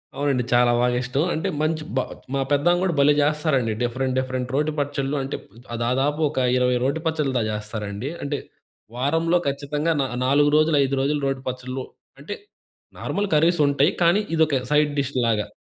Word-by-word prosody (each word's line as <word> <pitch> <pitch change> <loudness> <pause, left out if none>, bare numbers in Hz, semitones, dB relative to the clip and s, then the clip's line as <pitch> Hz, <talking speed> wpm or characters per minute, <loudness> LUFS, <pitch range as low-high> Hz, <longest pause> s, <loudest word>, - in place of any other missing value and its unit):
అవునండి. 140 -3 0
చాలా 120 0 +5
బాగా 125 0 +2
ఇష్టం. 135 +4 0
అంటే 160 - -1
మంచి 155 0 0
బా 130 - +2 0.3
మా 135 - +1
పెద్దమ్మ 175 +5 +3
గూడా 185 -3 +1
భలే 145 +1 +5
జేస్తారండి. 145 -5 +1
డిఫరెంట్ 130 +2 -1
డిఫరెంట్ 130 -1 -3
రోటి 150 +2 +1
పచ్చళ్లు 140 0 -1
అంటే, 135 +1 -4
ప్ 120 +3 -10
దాదాపు 135 +5 0
ఒక - - -10 0.2
20 125 0 +2
రోటి 140 +5 0
పచ్చళ్ళ 155 -4 0
దాకా 110 -2 0
చేస్తారండి. 105 +3 -5
అంటే, 140 0 -2 0.6
వారంలో 165 +7 +1
ఖచ్చితంగా 145 +3 -1
నా - - +1 0.2
నాలుగు 145 +2 +4
రోజులు, 155 0 +3
ఐదు 135 0 0
రోజులు 145 +1 0
రోటి 135 -1 -2
పచ్చళ్లు. 130 +1 -5 0.4
అంటే 150 +9 -6 0.6
నార్మల్ 205 +1 -2
కర్రీసుంటాయి. 150 -1 +3
కానీ 175 +5 +4
ఇదొక 155 -3 +3 0.2
సైడ్ 150 0 +3
డిష్ 140 0 -2
లాగా. 105 -2 0
140 Hz, 165 wpm, -23 LUFS, 130-150 Hz, 0.6 s, చాలా